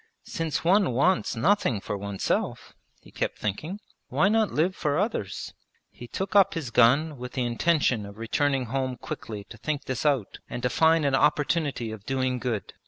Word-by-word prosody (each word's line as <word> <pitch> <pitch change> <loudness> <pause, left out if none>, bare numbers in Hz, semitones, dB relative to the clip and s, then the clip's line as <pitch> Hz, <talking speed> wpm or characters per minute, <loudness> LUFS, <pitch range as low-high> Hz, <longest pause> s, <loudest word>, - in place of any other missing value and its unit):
'Since 165 -2 -3
one 185 -3 +3
wants 175 +8 +2
nothing 145 - +2
for 105 - -4
oneself,' 100 -1 -2 0.3
he - - -17
kept - - -2
thinking, 155 - -4 0.3
'why 195 - +3
not 220 -1 +2
live 175 +5 +1
for 145 -1 0
others?' 180 - -2 0.4
He 120 - -11
took 190 - -4
up 195 -1 +5
his 150 -8 -4
gun 140 +5 +4
with 125 0 -7
the 130 - -1
intention 125 -2 +1
of 100 0 -12
returning 135 +4 0
home 130 +1 -2
quickly 105 -3 -6
to - - -13
think 150 -2 -3
this 130 -2 -3
out 140 -9 0
and 120 - -5
to 125 - +1
find 160 -1 +4
an 140 - +1
opportunity 145 -3 +1
of 110 -3 -8
doing 130 -1 0
good. 115 -6 -3
135 Hz, 175 wpm, -26 LUFS, 120-165 Hz, 0.4 s, up